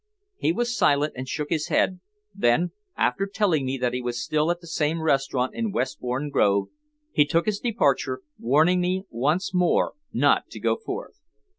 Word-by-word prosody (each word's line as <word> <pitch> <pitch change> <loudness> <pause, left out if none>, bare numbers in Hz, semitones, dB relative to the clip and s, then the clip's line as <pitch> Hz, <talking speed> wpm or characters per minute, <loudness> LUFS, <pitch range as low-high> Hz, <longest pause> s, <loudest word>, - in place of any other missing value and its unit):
He - - +1
was 240 +6 -1
silent 145 -4 +2
and 130 +1 -6
shook 150 +1 -3
his 155 -2 0
head; 185 - +1 0.3
then, 170 +1 +2 0.3
after 195 0 +1
telling 180 -9 +1
me 135 +1 -1
that 125 -1 -1
he 125 - -2
was 120 -1 -3
still 155 +4 0
at 175 0 0
the 175 - -15
same 160 0 -1
restaurant 135 -4 +1
in 225 -2 -2
Westbourne 130 0 -2
Grove, 100 -6 +2 0.4
he 150 - +5
took 165 +3 +1
his 210 -1 0
departure, 235 - 0 0.2
warning 155 +9 +3
me 185 +1 0
once 150 +11 0
more 180 -2 +2 0.2
not - - +2
to - - -9
go - - +1
forth. 450 - -7
155 Hz, 175 wpm, -25 LUFS, 130-180 Hz, 0.4 s, he